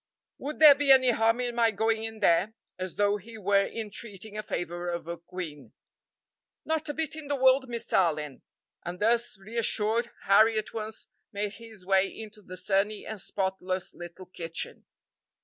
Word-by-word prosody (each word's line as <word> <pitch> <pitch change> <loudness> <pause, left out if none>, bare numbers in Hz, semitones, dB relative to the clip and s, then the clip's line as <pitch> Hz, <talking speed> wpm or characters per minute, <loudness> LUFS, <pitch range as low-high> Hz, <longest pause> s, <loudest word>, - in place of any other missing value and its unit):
"Would 295 +2 -5
there 305 -2 +10
be 280 0 +3
any 260 -2 +7
harm 225 +1 +2
in 245 -1 -2
my 235 -1 +3
going 220 +1 0
in 220 -1 -6
there?" 185 +6 +3 0.2
as 185 -1 -4
though 205 0 +2
he 225 +3 -12
were 200 -1 +2
entreating 215 -1 -7
a 215 - -2
favor 175 -2 -4
of 170 -1 -4
a 170 - -3
queen. 170 -4 -8 0.9
"Not 315 -1 -1
a - - -1
bit 315 -2 -2
in 310 -2 -7
the 285 - 0
world, 260 0 +4
Mr. 235 -1 -5
Allyn;" 150 -6 +1 0.4
and 175 +1 -6
thus 235 0 +1
reassured 225 +2 -1
Harry 220 +3 +5
at 215 - -3
once 220 -1 -6 0.2
made 205 0 -3
his 220 -5 -12
way 195 0 +4
into 215 0 -10
the 185 -2 -10
sunny 205 +2 0
and 215 -3 -4
spotless 190 -1 -3
little 175 +2 -10
kitchen. 165 -2 -6
215 Hz, 170 wpm, -28 LUFS, 185-230 Hz, 0.9 s, there